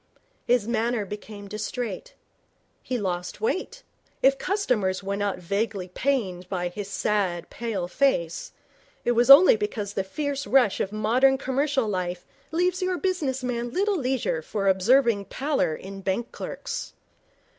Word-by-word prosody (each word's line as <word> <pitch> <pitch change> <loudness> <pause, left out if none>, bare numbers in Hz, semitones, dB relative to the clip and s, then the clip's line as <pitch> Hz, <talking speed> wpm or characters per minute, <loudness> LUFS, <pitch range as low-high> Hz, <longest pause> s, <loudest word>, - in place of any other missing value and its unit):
His 240 -3 +3
manner 235 -1 0
became 205 0 -8
distrait. 210 0 -5 0.7
He 255 - -2
lost 180 -4 -3
weight. 440 -4 -2 0.4
If 270 0 +5
customers 220 - 0
were 200 +1 -2
not 200 -1 -1
vaguely 200 +1 -2
pained 185 -6 -1
by 180 -2 -1
his 200 +2 -6
sad, 200 -5 -1
pale 215 -7 -3
face, 175 -7 0 0.5
it 240 - +3
was 240 +2 +2
only 360 - +10
because 230 - -3
the 195 - -1
fierce 285 +7 -3
rush 250 -7 +4
of 195 - -1
modern 245 +6 +3
commercial 270 -1 0
life 180 -3 -3 0.2
leaves 360 +3 0
your 370 -1 0
business 300 -9 -1
man 240 -1 -2
little 400 - +1
leisure 255 - -1
for 195 +5 -2
observing 205 +2 +3
pallor 275 - -1
in 195 +3 -9
bank 195 +6 -2
clerks. - - -6
225 Hz, 140 wpm, -25 LUFS, 195-270 Hz, 0.7 s, only